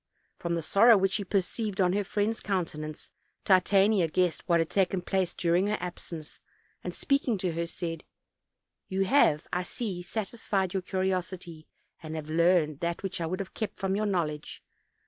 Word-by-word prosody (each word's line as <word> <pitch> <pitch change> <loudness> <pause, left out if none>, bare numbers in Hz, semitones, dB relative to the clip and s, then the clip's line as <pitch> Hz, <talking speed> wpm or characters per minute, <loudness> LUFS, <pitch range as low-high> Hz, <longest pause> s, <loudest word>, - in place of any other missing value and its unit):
From 170 0 -1
the 165 - -2
sorrow 220 +7 +6
which 195 0 +2
she 200 +2 -1
perceived 200 +2 -1
on 180 -1 +3
her 205 +1 +1
friend's 210 +3 -1
countenance, 155 -6 -3 0.3
Titania 195 0 +4
guessed 180 +2 0
what 170 -1 +5
had 165 - 0
taken 190 -2 +1
place 190 -2 0
during 175 +3 +2
her 210 - 0
absence; 170 -3 -7 0.4
and - - -3
speaking 275 -5 +1
to 180 -1 -1
her 170 +1 -2
said: 165 -1 -5 0.8
"You 195 +1 0
have, 175 - +4
I 180 - +1
see, 185 0 -4
satisfied 195 -1 -2
yonr 190 -1 -2
curiosity; 185 -3 -2 0.3
and 160 -1 -6
have 155 -1 -5
learned 165 -3 +3
that 170 +2 -2
which 185 -2 -3
I 165 - -1
would 185 +3 -2
have 195 - -8
kept 220 - -4
from 195 -1 -1
your 210 +1 0
knowledge. 155 -6 -2
185 Hz, 170 wpm, -29 LUFS, 170-195 Hz, 0.8 s, sorrow